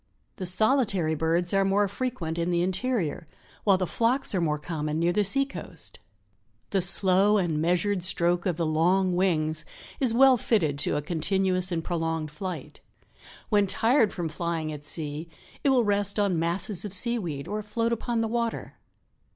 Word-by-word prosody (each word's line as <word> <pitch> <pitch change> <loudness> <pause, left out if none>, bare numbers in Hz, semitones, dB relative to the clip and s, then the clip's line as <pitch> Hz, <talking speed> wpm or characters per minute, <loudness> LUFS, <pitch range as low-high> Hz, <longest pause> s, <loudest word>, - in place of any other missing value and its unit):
The 185 - -1
solitary 195 - +2
birds 165 +3 0
are 195 0 +3
more 200 +1 +2
frequent 195 -7 -4
in 170 +1 -1
the 175 0 +1
interior, 185 - -2 0.4
while 195 -3 +5
the 185 - -1
flocks 235 +8 0
are 185 - 0
more 150 -2 0
common 150 0 -4
near 170 +2 +1
the 210 - +2
sea 275 +8 +2
coast. 275 - -6 0.7
The 195 - +1
slow 195 +3 +3
and 165 -6 0
measured 180 +3 +1
stroke 175 0 +2
of 175 -3 -1
the 170 - 0
long 180 +4 +2
wings 155 -4 0 0.4
is 255 -4 +3
well 260 +2 +5
fitted 165 -11 0
to 150 - +2
a 145 - -3
continuous 185 +3 +1
and 165 -2 -2
prolonged 165 -3 -3
flight. 185 +4 -7 0.7
When 205 -2 +3
tired 225 +3 +2
from 175 -3 -4
flying 160 -1 -3
at 145 -1 -9
sea 150 +1 -2 0.3
it 280 - +3
will 255 -3 +4
rest 205 0 +2
on 200 -5 +1
masses 175 +3 0
of 200 -2 0
seaweed 185 - -1
or 210 +2 -3
float 230 +2 -1
upon 235 0 -2
the 225 - 0
water. 235 0 -3
185 Hz, 170 wpm, -26 LUFS, 165-210 Hz, 0.7 s, while